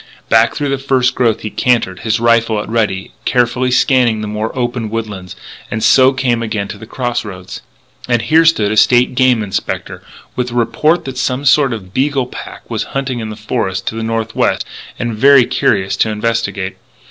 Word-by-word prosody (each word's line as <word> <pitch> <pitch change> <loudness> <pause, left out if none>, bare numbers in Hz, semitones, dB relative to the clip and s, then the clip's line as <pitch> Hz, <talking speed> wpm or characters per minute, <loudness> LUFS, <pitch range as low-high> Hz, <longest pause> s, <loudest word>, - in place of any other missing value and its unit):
Back 115 0 +4
through 145 -1 -2
the 135 -1 -1
first 130 -2 +1
growth 115 -4 +1
he 110 - -5
cantered, 115 -7 0
his 110 -1 -1
rifle 115 -1 +2
at 105 - -6
a - - -7
ready, 105 -5 -1
carefully 125 +1 +1
scanning 125 -3 +2
the 105 - -4
more 105 +1 -3
open 120 -2 -2
woodlands, 105 -5 -5 0.3
and 110 - -3
so 130 0 +6
came 125 -3 0
again 110 -3 -3
to - - -8
the 110 - -11
cross 120 -1 -2
roads. 95 -3 -9 0.5
And 120 -2 +1
here 160 +7 +4
stood 110 -11 +3
a 110 - -1
State 125 +4 +4
Game 125 -3 +3
Inspector, 100 -2 -4 0.3
with 125 0 -2
a 120 - -7
report 150 +8 +1
that 130 -1 -5
some 135 +1 -1
sort 140 0 +4
of 95 -5 -7
beagle 135 +1 0
pack 125 - -10
was - - -3
hunting 130 -3 -2
in 110 -1 -5
the 105 - -6
forest 105 -3 -3
to - - -8
the 115 - -4
northwest; 115 -1 -1 0.3
and 120 -1 -3
very 130 +3 +6
curious 95 -4 0
to 110 - +2
investigate. 105 -3 -2
115 Hz, 195 wpm, -15 LUFS, 110-130 Hz, 0.5 s, so